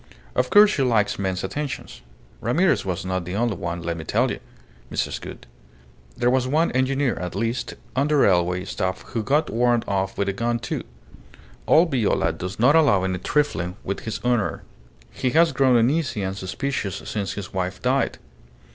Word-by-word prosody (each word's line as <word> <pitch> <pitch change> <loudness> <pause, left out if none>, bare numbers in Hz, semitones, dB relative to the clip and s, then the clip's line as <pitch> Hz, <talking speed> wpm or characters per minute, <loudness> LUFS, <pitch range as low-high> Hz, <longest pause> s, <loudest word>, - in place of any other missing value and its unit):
Of 125 - +1
course 210 0 +7
she 150 - -1
likes 110 -6 +2
men's 95 -2 -2
attentions. 145 +8 -5 0.4
Ramirez 170 - +2
was 95 0 -3
not 95 -1 -1
the 90 +2 -5
only 115 +1 +1
one, 85 -2 -4
let 85 0 -2
me 80 - -6
tell - - +1
you, - - -4 0.5
Mrs. - - -2
Gould. - - -9 0.7
There 120 0 +2
was 130 -1 +2
one 155 +5 +2
engineer, 130 0 +1
at 90 -1 -5
least, 115 +3 -2 0.2
on 140 +2 +2
the 150 - +2
railway 90 -7 +3
staff 95 0 -3
who 115 - -2
got 145 +7 +1
warned 120 0 +2
off 95 -1 -1
with 100 - 0
a 100 - 0
gun, 120 +3 0
too. - - -4 0.9
Old 165 +1 +5
Viola 120 -6 +1
does 90 +2 -6
not 130 +7 +5
allow 140 -13 +4
any 95 -1 -1
trifling 90 - 0
with 100 - -3
his 110 - -5
honour. 120 -4 0 0.5
He 130 - -1
has 165 0 +5
grown 130 -2 +3
uneasy 125 -2 +1
and 95 0 -2
suspicious 100 +2 -3
since 100 -3 -3
his 100 0 -7
wife 95 -1 -2
died. - - 0
115 Hz, 180 wpm, -23 LUFS, 95-135 Hz, 0.9 s, course